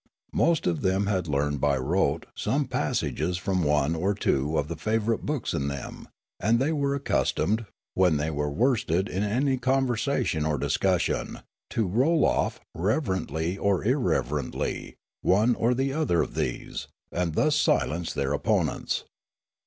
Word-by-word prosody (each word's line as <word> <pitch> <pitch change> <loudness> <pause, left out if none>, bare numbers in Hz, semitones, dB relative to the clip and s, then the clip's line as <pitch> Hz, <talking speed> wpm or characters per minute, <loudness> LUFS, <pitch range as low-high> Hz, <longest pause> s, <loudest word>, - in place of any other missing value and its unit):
Most 170 -2 +2
of 85 -3 0
them 95 +1 +1
had 95 -4 0
learned 75 -1 0
by 70 -2 +3
rote 65 - 0
some - - 0
passages 85 +4 -1
from 95 0 0
one 75 +1 +2
or 95 +5 0
two 75 -5 0
of 75 -1 0
the 85 - -4
favourite 110 +4 0
books 145 -5 -1
in 70 - -1
them; 70 -1 -6 0.3
and 115 +3 +3
they 135 +6 +1
were 140 -2 0
accus 140 - +1
tomed, 110 +2 0 0.3
when 90 -5 +3
they 75 +2 -1
were 75 -1 -1
worsted 100 - +1
in 95 - -2
any 130 +6 +1
conversation 130 - +1
or 75 -1 0
discussion, - - 0 0.3
to 110 - 0
roll 135 - +3
off, - - +1
relevantly 95 - -1
or 100 -1 +1
irrelevantly, 110 - -1 0.3
one 105 +6 +3
or 120 +2 +1
the 135 +2 0
other 145 - +2
of - - -7
these, - - -3 0.2
and 85 -2 -1
thus 155 -1 +3
silence 85 +2 +1
their 70 0 -1
opponents. 70 - 0
95 Hz, 155 wpm, -27 LUFS, 80-125 Hz, 0.3 s, by